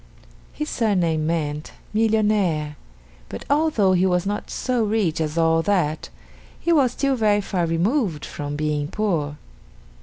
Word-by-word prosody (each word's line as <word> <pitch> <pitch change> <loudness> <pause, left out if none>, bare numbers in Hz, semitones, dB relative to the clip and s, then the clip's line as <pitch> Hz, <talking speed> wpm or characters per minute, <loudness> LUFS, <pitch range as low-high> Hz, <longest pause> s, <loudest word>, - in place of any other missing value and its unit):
His 300 - -4
surname 175 - +1
meant 150 -2 -2 0.2
"Millionaire," 210 -9 +1 0.5
but - - -7
although 285 -11 +3
he 185 +1 +3
was 180 0 +1
not 205 +1 -3
so 250 -3 -1
rich 205 -7 0
as 155 +1 -2
all 165 0 +3
that, 165 -5 0 0.5
he 340 - +1
was 270 -6 +3
still 275 -1 0
very 210 -3 +2
far 180 -4 -1
removed 175 - 0
from 145 0 -5
being 150 -1 -1
poor. 160 -7 -1
185 Hz, 140 wpm, -22 LUFS, 155-215 Hz, 0.5 s, although